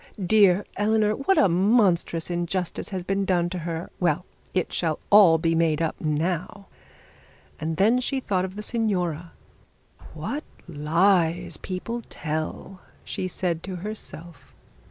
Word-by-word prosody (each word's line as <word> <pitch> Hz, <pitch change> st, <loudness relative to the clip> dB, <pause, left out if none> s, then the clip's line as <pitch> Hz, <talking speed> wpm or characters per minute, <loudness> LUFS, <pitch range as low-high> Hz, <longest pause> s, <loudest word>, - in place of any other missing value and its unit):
Dear 200 Hz, -1 st, +4 dB
Eleanor. 210 Hz, +1 st, +2 dB
What 320 Hz, -, +1 dB
monstrous 180 Hz, -3 st, +2 dB
injustice 175 Hz, +1 st, -2 dB
has 185 Hz, -3 st, -4 dB
been 195 Hz, +2 st, 0 dB
done 175 Hz, -2 st, +1 dB
her! 170 Hz, -2 st, -4 dB
Well, 170 Hz, -1 st, +1 dB, 0.3 s
it 180 Hz, -2 st, -1 dB
shall 160 Hz, -3 st, 0 dB
all 195 Hz, -6 st, +8 dB
be 165 Hz, +1 st, +1 dB
made 165 Hz, -2 st, +2 dB
up 165 Hz, -1 st, -2 dB
now.' 165 Hz, +5 st, -2 dB, 0.9 s
And 160 Hz, +1 st, -3 dB
then 225 Hz, +6 st, +4 dB
she 265 Hz, +2 st, -1 dB
thought 190 Hz, -7 st, -1 dB
of 190 Hz, 0 st, -5 dB
the 210 Hz, -, -5 dB
signora. 180 Hz, -8 st, -1 dB, 0.8 s
'What 295 Hz, +2 st, -4 dB, 0.2 s
lies 170 Hz, +2 st, +1 dB
people 230 Hz, +6 st, -5 dB
tell,' 160 Hz, +4 st, -5 dB, 0.2 s
she 185 Hz, -, -4 dB
said 175 Hz, -2 st, -2 dB
to 185 Hz, +1 st, -6 dB
herself. 175 Hz, -5 st, -9 dB
180 Hz, 130 wpm, -25 LUFS, 165-200 Hz, 0.9 s, all